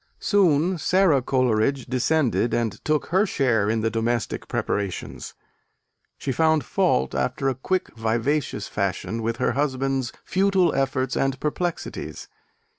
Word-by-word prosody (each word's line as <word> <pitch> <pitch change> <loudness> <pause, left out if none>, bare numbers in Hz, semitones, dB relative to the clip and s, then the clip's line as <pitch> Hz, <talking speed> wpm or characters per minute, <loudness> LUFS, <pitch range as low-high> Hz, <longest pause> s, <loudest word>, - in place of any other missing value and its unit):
Soon 180 -3 +2
Sara 180 -4 +3
Coleridge 130 0 +1
descended 130 -1 +1
and 115 -3 -2
took 155 -1 +1
her 195 +4 +4
share 120 - +1
in 110 0 +1
the 115 0 0
domestic 115 0 -1
preparations. 100 -3 -3 0.8
She 135 - -3
found 160 0 +2
fault, 65 +1 +1
after 135 - 0
a - - 0
quick 185 +9 -2
vivacious 115 +6 -1
fashion, 100 +3 -2
with 115 0 -2
her 125 - +1
husband's 135 -2 -1
futile 190 -2 +2
efforts 135 -1 0
and 135 0 0
perplexities. 170 +4 -4
135 Hz, 125 wpm, -24 LUFS, 115-155 Hz, 0.8 s, her